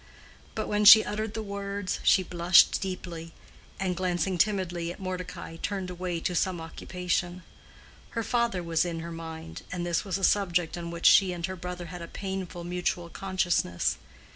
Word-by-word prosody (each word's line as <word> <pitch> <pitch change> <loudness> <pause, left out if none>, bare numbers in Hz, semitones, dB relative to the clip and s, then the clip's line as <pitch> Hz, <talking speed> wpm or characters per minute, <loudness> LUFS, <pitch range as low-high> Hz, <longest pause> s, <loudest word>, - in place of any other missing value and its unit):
But - - -2
when 210 0 +1
she 215 +1 +11
uttered 215 +1 -3
the 220 - -3
words 200 -1 -4
she 190 - +4
blushed 175 0 +5
deeply, 175 -3 -6 0.5
and 185 -2 -1
glancing 180 0 -1
timidly 175 -4 0
at - - -10
Mordecai, 180 -3 -6
turned 190 0 -3
away 180 -1 -3
to 180 - -1
some 180 0 0
occupation. 175 +2 -3 0.7
Her 230 - +1
father 235 -6 0
was 165 -1 +1
in 170 -2 -3
her 170 +1 -6
mind, 160 - -7
and 175 -1 -3
this 170 -1 0
was 190 -3 -2
a 195 - -7
subject 180 -4 +2
on 170 -1 -5
which 170 0 -6
she 190 -2 +7
and 170 -1 -3
her 190 - -5
brother 180 0 -6
had 175 - -7
a 170 - -6
painful 190 -2 -5
mutual 175 0 -2
consciousness. 185 - 0
180 Hz, 170 wpm, -28 LUFS, 170-190 Hz, 0.7 s, she